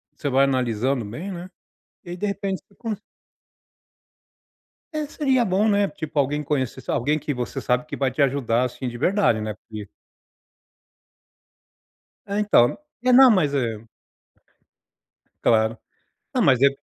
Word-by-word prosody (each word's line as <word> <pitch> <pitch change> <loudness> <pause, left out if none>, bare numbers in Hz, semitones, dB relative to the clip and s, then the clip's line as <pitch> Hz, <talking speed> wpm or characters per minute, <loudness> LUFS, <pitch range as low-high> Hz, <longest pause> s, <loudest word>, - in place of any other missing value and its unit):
você 145 - -3
vai 135 +1 +4
analisando 125 -1 0
bem, 160 - -6
né, 180 +1 -7 0.6
e 175 - -9
aí 175 - -5
de 210 - -2
repente 195 -1 -2
você 200 - -26
con 225 -3 -3 2.0
É, 305 -1 -2
seria 265 -5 +1
bom, 200 +3 +2
né, 205 -1 +3
tipo 155 -2 -5
alguém 145 +2 +1
conhecesse, 135 -4 -2
alguém 150 +6 +1
que 145 -1 -3
você 125 -1 -4
sabe 125 +2 0
que 155 - -7
vai 135 -2 +1
te 145 - 0
ajudar, 130 -3 +1
assim, 125 +1 -4
de 120 - -6
verdade, 180 - +2
né, 110 0 -3
porque 105 -1 -10 2.4
É, 200 +1 -2
então. 125 - +4 0.3
É, 255 - +4
não, 260 0 +9
mas 155 -9 +2
é 115 -5 -1 1.6
Claro. 110 0 +3 0.6
Não, - - +1
mas 130 -2 +4
é 140 - +7
140 Hz, 145 wpm, -23 LUFS, 125-195 Hz, 2.4 s, não